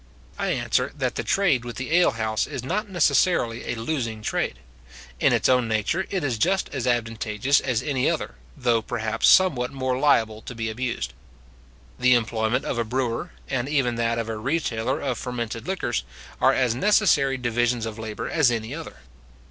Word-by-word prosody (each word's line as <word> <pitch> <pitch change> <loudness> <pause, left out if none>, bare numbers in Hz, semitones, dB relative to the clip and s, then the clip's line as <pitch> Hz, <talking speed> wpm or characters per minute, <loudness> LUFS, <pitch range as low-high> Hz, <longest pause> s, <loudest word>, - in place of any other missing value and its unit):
I - - -1
answer, - - 0
that - - -1
the - - -3
trade 175 -11 +2
with 120 -1 -7
the 130 +4 -4
alehouse 115 -10 +2
is 125 - -5
not 205 +10 -2
necessarily 175 -9 +2
a - - -2
losing 115 -3 -3
trade. - - -1 0.6
In - - +4
its - - +2
own 125 -2 +3
nature 110 - 0
it 190 -5 -2
is 125 -6 -1
just 190 - +1
as 130 -3 -2
advantageous 115 +1 +1
as 125 -3 -1
any 135 -3 +1
other, - - -2 0.2
though, 120 -2 +2
perhaps, 115 -1 -1
somewhat 135 -10 +5
more 130 -1 -2
liable 110 -7 +2
to 125 - -8
be 115 -1 -3
abused. 110 - -3 0.9
The 125 0 +5
employment 115 +1 0
of 120 - -2
a - - +2
brewer, 125 +6 -2 0.2
and 130 0 -2
even 135 -5 +1
that 115 0 0
of 115 -1 -2
a 110 -1 -3
retailer 125 -2 -1
of 130 -4 -2
fermented 120 -3 -4
liquors, 150 - -1 0.4
are - - +6
as 125 -3 +2
necessary 140 - +3
divisions 120 -1 0
of 110 0 -6
labour 110 -2 -5
as 160 -6 +3
any 115 +1 -3
other. 150 - -8
120 Hz, 175 wpm, -24 LUFS, 115-135 Hz, 0.9 s, are